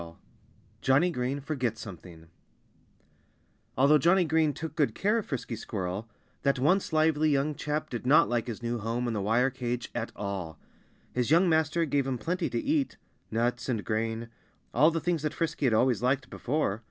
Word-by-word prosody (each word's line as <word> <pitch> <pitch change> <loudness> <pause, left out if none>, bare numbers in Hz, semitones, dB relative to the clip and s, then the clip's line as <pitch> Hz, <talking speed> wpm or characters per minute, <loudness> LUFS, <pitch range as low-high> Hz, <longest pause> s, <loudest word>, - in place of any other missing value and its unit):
XX 85 0 -10 0.7
Johnnie 145 +7 +3
Green 130 -1 -2
Forgets 130 -6 -2
Something 85 -4 -10 1.5
Although 140 +3 +5
Johnnie 175 +5 +4
Green 160 -1 +2
took 160 +2 -6
good 150 -4 +1
care 210 +4 +2
of 220 - -7
Frisky 125 -3 -4
Squirrel, 100 0 -4 0.3
that 140 -1 +2
once 170 +10 +2
lively 155 -1 +3
young 145 +1 +1
chap 150 +1 -3
did 120 - -4
not 150 +5 +6
like 120 -1 -1
his 120 0 -6
new 120 0 -1
home 115 +3 -2
in 120 - -1
the 105 - -1
wire 115 +6 +2
cage 125 -2 -4
at 120 -1 -3
all. 95 -6 -5 0.6
His 125 -1 0
young 170 +4 +5
master 160 0 +2
gave 140 -2 0
him 130 -2 -1
plenty 175 - -2
to - - -1
eat 295 -2 0 0.3
nuts 120 +3 -1
and 115 -4 -1
grain 115 +1 -2 0.4
all 150 +6 +5
the 165 0 -1
things 170 -1 -1
that 150 -1 -2
Frisky 160 -4 0
had 120 - +2
always 120 -2 +2
liked 130 +1 0
before. 125 -6 -1
130 Hz, 180 wpm, -28 LUFS, 115-155 Hz, 1.5 s, not